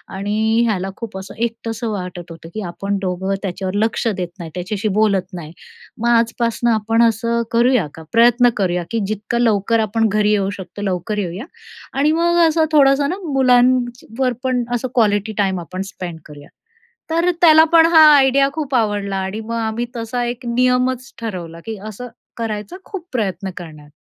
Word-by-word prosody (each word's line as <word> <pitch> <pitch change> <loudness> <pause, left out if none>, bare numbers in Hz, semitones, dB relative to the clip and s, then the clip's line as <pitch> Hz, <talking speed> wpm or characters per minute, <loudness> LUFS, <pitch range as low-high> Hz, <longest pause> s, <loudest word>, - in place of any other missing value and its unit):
आणि 215 +4 +1
ह्याला 195 -3 -1
खूप 220 -5 -7
असं 190 - -8
एकटंसं 230 0 -3
वाटत 180 -3 -6
होतं, 165 0 -11
की 215 - -4
आपण 200 +3 -3
दोघं 190 +1 -2
त्याच्यावर 190 0 -4
लक्ष 225 +1 -1
देत 185 -5 -1
नाही, 165 -2 -6
त्याच्याशी 195 +4 -3
बोलत 200 -3 +1
नाही. 165 -4 -7 0.5
मग 235 - 0
आजपासनं 235 0 +1
आपण 225 +1 +2
असं 230 +1 +1
करूया 235 - +3
का? 160 - -11
प्रयत्न 240 +1 +5
करूया 180 -3 0
की 230 - 0
जितका 215 +3 -3
लवकर 225 -1 +2
आपण 220 +1 +1
घरी 210 +1 +2
येऊ 200 -2 +1
शकतो, 195 +1 -9
लवकर 195 +2 -2
येऊया. 190 +2 -4 0.5
आणि 290 +3 +2
मग 345 0 +2
असं 320 0 +2
थोडंसं 280 -1 +4
ना, 365 - -2 0.2
मुलांची 250 -1 +2
वर 255 -2 +2
पण 255 -1 0
असं 250 +2 -2
क्वालिटी 215 -2 +2
टाईम 190 -2 +1
आपण 180 +3 -6
स्पेंड 175 -3 -7
करूया. 145 -1 -13 0.6
तर 335 +2 +1
त्याला 315 -2 +8
पण 325 -1 +7
हा 320 - +8 0.2
आयडिया 275 0 +4
खूप 290 -4 -3
आवडला. 205 -4 0
आणि 190 +3 -3
मग 230 +1 -5
आम्ही 225 +1 -2
तसा 235 +1 -3
1 240 +1 -5
नियमच 250 +1 +1
ठरवला, 175 -7 -6
की 225 -1 -5
असं 245 +4 -8 0.3
करायचा 215 - -4
खूप 390 -4 -7
प्रयत्न 195 -5 -2
करणार. 155 -4 -10
220 Hz, 170 wpm, -19 LUFS, 195-245 Hz, 0.6 s, त्याला